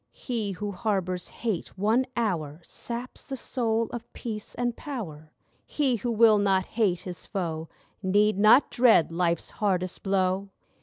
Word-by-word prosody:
He 220 -6 -3
who 205 +2 -4
harbours 190 -4 -1
Hate 215 -7 -4
one 225 +7 +2
hour 165 -10 -1
Saps 240 +7 -6
the 270 - -5
soul 230 -2 0
of 235 -1 -7
Peace 215 -3 -6
and 240 -1 -1
Power. 160 - -7 0.3
He 270 -5 0
who 240 +3 -3
will 220 -2 +6
not 190 -2 +2
hate 195 -6 0
his 180 -3 -7
foe 165 -5 -3 0.3
Need 205 +1 +3
not 220 +7 +6
dread 225 -10 +5
life's 170 -1 0
hardest 185 -3 -1
blow. 190 0 0
205 Hz, 145 wpm, -27 LUFS, 185-230 Hz, 0.3 s, will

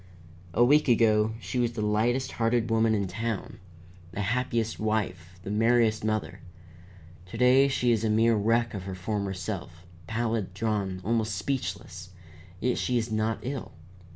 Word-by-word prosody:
"A 120 - +5
week 150 +4 +4
ago 110 -2 +3
she 125 - -3
was 120 -1 +1
the 110 -2 -3
lightest 120 +5 +1
hearted 115 0 0
woman 110 0 +3
in 100 -1 0
town, 110 +3 -4 0.5
the 105 - -3
happiest 115 +1 -1
wife, 95 -5 -2
the 100 - -5
merriest 115 0 +2
mother. 110 -1 -2 0.9
To 100 - -8
day 130 +3 +5
she 125 -3 +1
is 115 -2 +1
a 110 - +1
mere 115 +2 +4
wreck 115 +3 +1
of 95 -3 -6
her 95 -1 -5
former 100 +1 -3
self, 90 -1 -6 0.2
pallid, 110 -4 -2
drawn, 100 -3 -2
almost 110 -2 0
speechless, 95 -6 -4 0.5
yet 125 +4 0
she 125 - 0
is 115 -1 -2
not 110 +1 -1
ill. 130 0 -5
110 Hz, 155 wpm, -27 LUFS, 105-120 Hz, 0.9 s, A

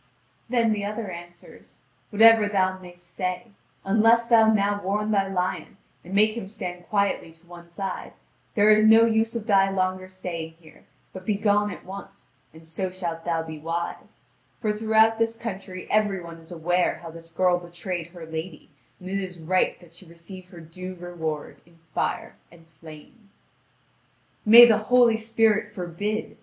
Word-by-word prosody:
Then 230 -3 +2
the 205 -1 -3
other 210 -1 -4
answers: 175 0 -12 0.3
"Whatever 225 0 +6
thou 185 -2 0
mayst 175 -1 -14
say; 180 +5 -4 0.3
unless 225 +4 +4
thou 225 -2 +5
now 205 -1 +1
warn 210 +3 -1
thy 195 -2 +2
lion, 185 -1 -3 0.3
and 185 +3 -7
make 215 +2 +3
him 230 -5 -6
stand 180 -4 -7
quietly 200 -5 0
to 165 +1 -25
one 170 0 -13
side, 190 +2 -6 0.4
there 210 -1 +5
is 215 0 +5
no 225 +1 +7
use 225 0 +1
of 225 -2 -4
thy 195 -3 +4
longer 185 -1 -2
staying 175 -3 -6
here, 160 -1 -20 0.3
but 185 - -9
begone 205 0 +1
at 190 - -9
once, 195 +1 -11 0.2
and 160 +1 -16
so 185 +4 -3
shalt 170 -3 -5
thou 165 -1 -1
be 160 -1 -8
wise; 165 +2 -5 0.4
for 215 -3 -1
throughout 220 +1 +3
this 230 0 0
country 195 -5 -7
every 210 -3 +2
one 170 -1 -10
is 160 +1 -17
aware 175 +1 0
how 165 - -8
this 165 0 -13
girl 180 +1 +2
betrayed 175 0 -6
her 170 -1 -11
lady, 160 0 -7 0.3
and 185 - -11
it 195 +1 -2
is 180 -3 -7
right 180 +3 0
that 170 -2 -18
she 175 +1 -13
receive 175 +2 -12
her 175 - -12
due 185 +3 -9
reward 165 -4 -6
in 170 0 -24 0.2
fire - - -2 0.2
and 165 -1 -18
flame." 165 +8 -14 1.2
"May 235 +3 +11
the 220 -3 +4
Holy 235 0 +4
Spirit 220 -1 +1
forbid!" 205 +3 -4
185 Hz, 170 wpm, -25 LUFS, 175-215 Hz, 1.2 s, May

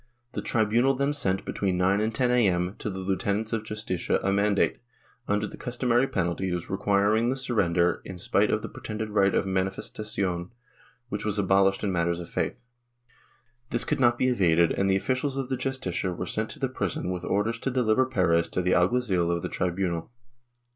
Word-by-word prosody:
The - - -4
tri 110 -2 +1
bunal 120 +5 +2
then 140 +2 +1
sent, 95 -10 0
between 95 -3 -1
9 95 +3 +2
and 110 +1 0
10 125 +1 +2
a.m., 95 -6 +2
to - - -3
the 95 - -5
lieutenants 100 +3 -1
of 115 - 0
the 110 - -15
Justicia 105 -5 -1
a 95 - +1
mandate, 100 0 +2 0.5
under 105 +1 +1
the - - -8
customary 125 +1 +1
penalties, 90 -2 -2
requiring 100 +4 +2
the 130 - 0
surrender 90 -10 +1
in 95 - -8
spite - - +2
of - - 0
the - - -3
pretended 110 0 -6
right 100 -2 +3
of - - +2
manifestacion, 95 -1 -2 0.6
which - - -3
was 105 -1 -1
abolished 95 0 +3
in 100 - 0
matters 85 -1 0
of 85 - -8
faith. - - -3 1.0
This 120 - 0
could - - -1
not 120 -2 +4
be 130 - +2
evaded 85 -8 +3
and 95 0 +1
the 95 - +3
officials 130 +6 -1
of 135 -2 -3
the 130 - 0
Justicia 130 -8 -2
were 90 - -4
sent - - -2
to - - -7
the - - 0
prison 90 - -3
with 90 -1 -4
orders 110 +4 0
to 135 - -2
deliver 125 -1 +2
Perez 85 -8 +2
to 90 - -1
the 90 - +2
alguazil 90 -2 +2
of 85 0 -1
the - - -2
tribunal. 90 -1 -2
100 Hz, 195 wpm, -27 LUFS, 90-120 Hz, 1.0 s, not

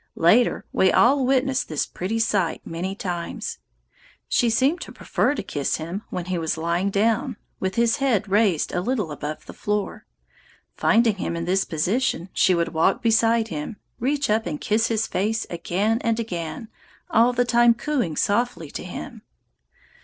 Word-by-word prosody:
Later, 215 +9 +3
we 190 - +4
all 260 +1 +4
witnessed 265 0 +1
this 155 -3 -1
pretty 195 +6 -3
sight 205 -6 0
many 180 +4 -4
times. 175 -4 -4 0.7
She 240 - +2
seemed 270 +10 +2
to - - -7
prefer 290 - 0
to - - -4
kiss 145 -2 -2
him 170 +6 -5
when 180 - -4
he 180 -1 -2
was 160 0 -1
lying 170 +4 0
down, 220 +4 +1 0.2
with 190 0 -2
his 235 +3 +2
head 250 -8 +1
raised 195 -5 +2
a 180 - 0
little 210 -6 -1
above 150 +1 -6
the - - -10
floor. 210 -1 -3 0.7
Finding 225 -2 +3
him 170 - -3
in 170 0 -3
this 190 +2 +1
position, 180 +3 -1
she 185 - +3
would 170 -1 0
walk 160 +7 +2
beside 225 0 +3
him, 155 +6 -5 0.2
reach 280 +3 0
up 215 -2 +1
and 150 -3 -3
kiss 225 +2 +1
his 225 -1 0
face 215 +4 -1
again 195 +6 0
and 230 0 0
again, 200 +1 -5 0.4
all 230 +3 +5
the 245 0 +1
time 240 -1 +4
cooing 240 - -1
softly 205 -7 0
to - - -6
him. - - -8
210 Hz, 170 wpm, -23 LUFS, 175-235 Hz, 0.7 s, all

